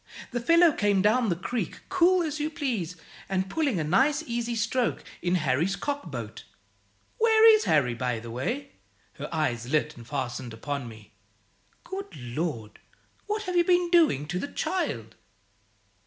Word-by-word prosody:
The 240 - -1
fellow 335 +5 +6
came 205 -7 +1
down 220 +2 +3
the 175 - +1
creek, 190 +1 -4
cool 365 -1 +4
as 310 -1 -3
you 300 +1 -1
please, 225 - -3 0.3
and 190 0 0
pulling 280 - 0
a - - 0
nice 270 - +2
easy 235 0 -2
stroke, 235 +2 0 0.2
in 175 +1 +1
Harry's 155 +4 +1
cockboat. 285 +4 -5 0.8
Where 445 0 +6
is 435 0 +3
Harry, 130 -5 +3
by 125 -1 -2
the 115 0 -9
way?" 250 - -3 0.5
her - - -5
eyes 125 -7 -1
lit 150 0 +1
and 115 -1 -12
fastened 125 -3 -4
upon 140 +2 -4
me 110 -3 -13 0.7
"Good 380 - -7
Lord! 120 -3 -4 0.5
what 425 +1 -2
have 365 -3 -3
you 345 - +5
been 355 0 +2
doing 320 - +4
to 180 - -1
the - - -3
child?" 125 - -3
195 Hz, 155 wpm, -27 LUFS, -, 0.8 s, fellow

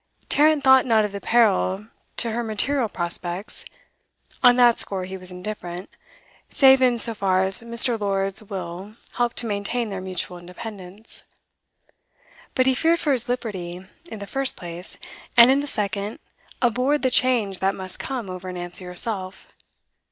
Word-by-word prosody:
Tarrant 300 0 +4
thought 265 -1 +7
not 220 -3 +4
of 210 - -4
the 200 0 -6
peril 210 -3 +2 0.3
to 235 - +1
her 235 +2 -1
material 235 +3 0
prospects; 175 +2 -4 0.8
on 245 -1 +7
that 240 -2 +5
score 190 -2 0
he 190 +1 -7
was 185 -1 -8
indifferent, 180 -1 -7 0.6
save 265 -1 +6
in 250 -2 +4
so 230 0 +3
far 190 -3 +1
as 190 +2 0
Mr 235 0 +2
Lord's 195 -1 0
will 190 0 -7 0.2
helped 240 -1 0
to 240 - -2
maintain 215 +2 -2
their 190 -1 -4
mutual 180 -1 -4
independence. 190 +3 -10 1.3
But 255 - +3
he 265 - +4
feared 330 +6 +2
for 300 - 0
his 245 -2 0
liberty, 190 -7 -4 0.3
in - - -6
the 200 - -7
first 270 +5 -1
place, 175 +1 -7 0.4
and 235 +2 +9
in 275 - +3
the 290 - -3
second, 205 -3 -3 0.5
abhorred 250 +5 +2
the 260 - +2
change 235 -7 +2
that 195 +1 +1
must 185 -1 -6
come 255 -6 -4
over 185 0 -6
Nancy 175 +1 -6
herself. 185 +1 -2
210 Hz, 160 wpm, -23 LUFS, 185-245 Hz, 1.3 s, and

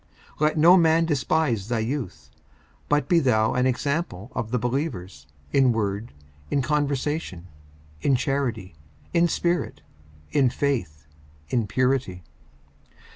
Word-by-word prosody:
54:004:012 - - -13
Let 155 +1 +2
no 170 +4 +7
man 165 -1 +4
despise 140 - 0
thy 120 0 -1
youth; 115 -1 -4 0.6
but 150 0 +2
be 175 -3 +4
thou 110 -6 +2
an 125 +1 +2
example 130 - -2
of 110 - -3
the 125 - 0
believers, 120 - -3 0.3
in 130 -3 +4
word, 105 +1 -2 0.4
in 140 - +1
conversation, 145 - -2 0.5
in 135 - +3
charity, 125 -8 -2 0.4
in 170 0 +4
spirit, 175 +1 -1 0.5
in 135 -3 +3
faith, 115 - -2 0.4
in 115 -4 0
purity. 125 -6 0
130 Hz, 125 wpm, -24 LUFS, 110-150 Hz, 0.6 s, no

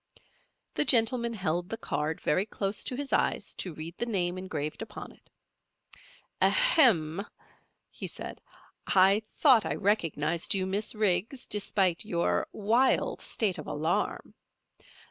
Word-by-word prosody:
The - - +3
gentleman 235 -2 +2
held 175 -2 -2
the 225 - -4
card 155 -6 -2
very 185 +7 +1
close 200 -1 -2
to 255 - -2
his 280 +1 -4
eyes - - +1
to 180 - -4
read 165 +3 -8
the 240 - -1
name 180 -5 -1
engraved 160 -5 -5
upon - - -8
it. - - -24 1.1
"Ahem!" 230 - +4 0.7
he - - -6
said. - - -7 0.5
"I 195 +2 +5 0.2
thought 255 -8 +6
I - - -2
recognized 170 -4 0
you, 190 -1 0
Miss 200 +4 -1
Riggs, 215 +5 0
despite 195 -4 0
your 170 -5 0
wild 230 +6 +1
state 205 -5 -1
of - - -8
alarm. 160 +3 -2
195 Hz, 130 wpm, -29 LUFS, 175-225 Hz, 1.1 s, thought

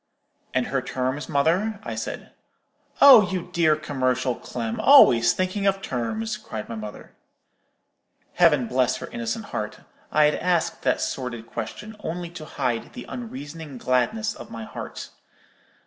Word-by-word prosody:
"'And 130 -1 +2
her 135 -1 -1
terms, 130 +2 -3
mother?' 185 +9 +1
I - - -5
said. - - -6 0.7
"'Oh, 240 -9 +9
you 180 -1 -4
dear 160 -3 +4
commercial 130 -4 0
Clem, 115 -1 -5
always 120 - +7
thinking 185 +2 -1
of 195 0 +2
terms!' 215 - -3
cried 115 - -7
my - - -6
mother. 105 -2 -8 1.2
"Heaven 150 -7 +4
bless 125 +1 +1
her - - -7
innocent 115 -1 -3
heart! - - -4 0.3
I 150 - +4
had 150 - +3
asked 175 -2 0
that 130 - +1
sordid 120 0 -4
question 120 - -7
only 175 -2 -5
to 165 -3 -8
hide 125 -6 -3
the 250 - -8
unreasoning 155 - -7
gladness 215 - 0
of - - -11
my 115 -1 -7
heart. - - -8
145 Hz, 145 wpm, -24 LUFS, 125-185 Hz, 1.2 s, Oh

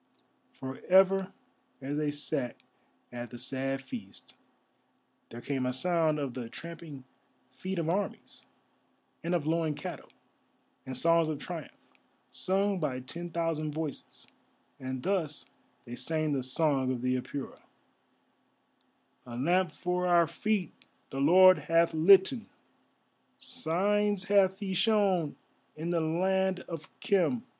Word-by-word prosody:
For 130 0 -8
ever 190 0 +5 0.5
as 140 +2 -4
they 150 0 0
sat 145 -4 -2 0.6
at 120 -1 -6
the 120 - -9
sad 135 +2 -2
feast 105 -7 -10 1.0
there 120 - -9
came 135 -1 -2
a 125 - -1
sound 160 +2 +2
of 140 -4 -3
the 120 -2 -6
tramping 160 0 -9 0.5
feet 190 +8 -5
of 165 -2 -1
armies, 195 +5 -3 0.8
and 170 +1 0
of 165 -4 -1
lowing 160 -1 0
cattle, - - -7 0.8
and 130 -1 -4
songs 165 +2 +3
of 155 - -2
triumph, 165 +1 -7 0.5
sung 195 +1 +1
by 140 -6 -2
ten 170 +7 -7
thousand 165 -3 -2
voices, 155 -3 -6 0.5
and 130 -1 -5
thus 175 -6 -1 0.4
they 120 - -9
sang 155 +3 -1
the 135 - 0
song 135 0 +1
of 125 -1 -3
the 125 0 +1
Apura:— 130 +2 -5 1.7
A 120 -1 -7
lamp 175 +7 +2
for 180 +2 -1
our 175 -1 +5
feet 195 +2 -1 0.4
the 135 - -4
Lord 185 +3 +7
hath 165 +3 +2
litten, 195 - +5 0.9
Signs 205 +4 0
hath 195 -1 +3
He 195 -2 -2
shown 190 -6 +2 0.4
in 165 +3 -3
the 170 -1 +1
Land 190 +3 +1
of 165 -2 -8
Khem. 205 +5 +2
165 Hz, 130 wpm, -30 LUFS, 135-185 Hz, 1.7 s, Lord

